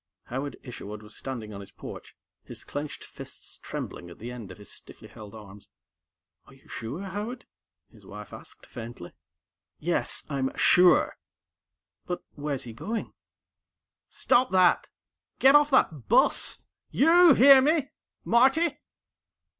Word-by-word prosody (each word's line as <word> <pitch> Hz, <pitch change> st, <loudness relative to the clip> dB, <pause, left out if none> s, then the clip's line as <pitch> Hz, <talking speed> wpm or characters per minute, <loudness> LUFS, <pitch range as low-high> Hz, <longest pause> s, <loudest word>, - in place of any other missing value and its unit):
_" -, -, -24 dB
Howard 135 Hz, +3 st, -4 dB
Isherwood 105 Hz, -4 st, -9 dB
was 105 Hz, 0 st, -9 dB
standing 115 Hz, -5 st, -6 dB
on 100 Hz, -, -8 dB
his 100 Hz, -, -12 dB
porch, -, -, -11 dB, 0.3 s
his -, -, -10 dB
clenched 145 Hz, +1 st, -6 dB
fists -, -, -11 dB
trembling 85 Hz, -, -7 dB
at 85 Hz, -, -13 dB
the 120 Hz, +3 st, -7 dB
ends 120 Hz, -5 st, -9 dB
of -, -, -12 dB
his 105 Hz, -2 st, -11 dB
stiffly -, -, -12 dB
held 105 Hz, -1 st, -12 dB
arms. 105 Hz, -2 st, -13 dB, 0.8 s
"Are -, -, -17 dB
you -, -, -24 dB
sure, 130 Hz, -, -6 dB
Howard?" 210 Hz, +6 st, -6 dB, 0.5 s
his -, -, -19 dB
wife 105 Hz, +2 st, -11 dB
asked -, -, -12 dB
faintly. 115 Hz, -7 st, -9 dB, 0.7 s
"Yes, 170 Hz, +3 st, -2 dB
I'm 135 Hz, -2 st, -3 dB
sure!" 180 Hz, 0 st, +4 dB, 0.9 s
"But, 180 Hz, -, -4 dB
where's 145 Hz, -2 st, -4 dB
he 115 Hz, -, -9 dB
going?" 220 Hz, -, -5 dB, 1.0 s
"Stop 255 Hz, +1 st, +2 dB
that! 185 Hz, -1 st, +3 dB, 0.5 s
Get 270 Hz, +1 st, +6 dB
off 295 Hz, 0 st, +6 dB
that 155 Hz, -, +1 dB
bus! -, -, +2 dB, 0.3 s
YOU 330 Hz, +1 st, +6 dB
hear 270 Hz, +1 st, +8 dB
me? 295 Hz, 0 st, +1 dB, 0.3 s
Marty?" 270 Hz, +7 st, +3 dB
145 Hz, 140 wpm, -27 LUFS, -, 1.0 s, hear